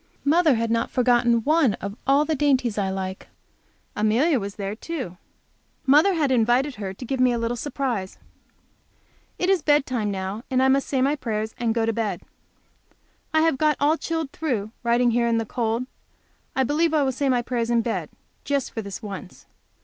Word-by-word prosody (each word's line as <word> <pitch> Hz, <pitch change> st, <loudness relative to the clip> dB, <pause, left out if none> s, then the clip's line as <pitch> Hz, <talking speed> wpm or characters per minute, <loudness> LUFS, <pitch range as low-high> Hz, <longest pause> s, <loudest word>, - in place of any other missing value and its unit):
Mother 310 Hz, -1 st, +4 dB
had 230 Hz, 0 st, -1 dB
not 230 Hz, 0 st, 0 dB
forgotten 240 Hz, -2 st, +2 dB
one 300 Hz, -6 st, +3 dB
of 200 Hz, +1 st, -6 dB
all 280 Hz, +2 st, +4 dB
the 315 Hz, -, 0 dB
dainties 265 Hz, -6 st, +1 dB
I 195 Hz, -2 st, -1 dB
like. 190 Hz, 0 st, -5 dB, 0.7 s
Amelia 240 Hz, +8 st, +2 dB
was 200 Hz, -1 st, -6 dB
there 200 Hz, -1 st, -4 dB
too. 245 Hz, -, -6 dB, 0.7 s
Mother 310 Hz, +8 st, +5 dB
had 295 Hz, -5 st, +1 dB
invited 250 Hz, +4 st, +2 dB
her 195 Hz, -2 st, -4 dB
to 195 Hz, +7 st, -9 dB
give 265 Hz, +2 st, -3 dB
me 255 Hz, -1 st, +4 dB
a 240 Hz, -, 0 dB
little 230 Hz, +1 st, -1 dB
surprise. 245 Hz, -7 st, -3 dB, 1.2 s
It 360 Hz, -, 0 dB
is 380 Hz, -3 st, +3 dB
bedtime 265 Hz, -8 st, +1 dB
now, 195 Hz, +3 st, -4 dB
and 260 Hz, -1 st, +2 dB
I 265 Hz, -, +4 dB
must 275 Hz, +1 st, +2 dB
say 265 Hz, -2 st, +1 dB
my 280 Hz, +2 st, +2 dB
prayers 220 Hz, -5 st, -3 dB
and 235 Hz, -1 st, 0 dB
go 230 Hz, -1 st, +1 dB
to 225 Hz, -, 0 dB
bed. 220 Hz, -2 st, -2 dB, 1.1 s
I 315 Hz, -, +3 dB
have 320 Hz, -4 st, +2 dB
got 305 Hz, -1 st, +2 dB
all 295 Hz, +2 st, +3 dB
chilled 325 Hz, -3 st, -3 dB
through, 235 Hz, -11 st, -2 dB
writing 240 Hz, 0 st, +2 dB
here 235 Hz, 0 st, +2 dB
in 230 Hz, -1 st, +2 dB
the 225 Hz, -, -1 dB
cold. 230 Hz, +1 st, -1 dB, 0.7 s
I 265 Hz, -, +3 dB
believe 315 Hz, +5 st, +1 dB
I 300 Hz, -, +3 dB
will 265 Hz, -, +1 dB
say 275 Hz, +2 st, -1 dB
my 245 Hz, -2 st, +2 dB
prayers 235 Hz, -1 st, -2 dB
in 235 Hz, -1 st, +2 dB
bed, 230 Hz, -, -3 dB, 0.3 s
just 280 Hz, -2 st, -1 dB
for 225 Hz, -, -4 dB
this 200 Hz, +1 st, -8 dB
once. 195 Hz, -2 st, -8 dB
245 Hz, 190 wpm, -24 LUFS, 225-285 Hz, 1.2 s, Mother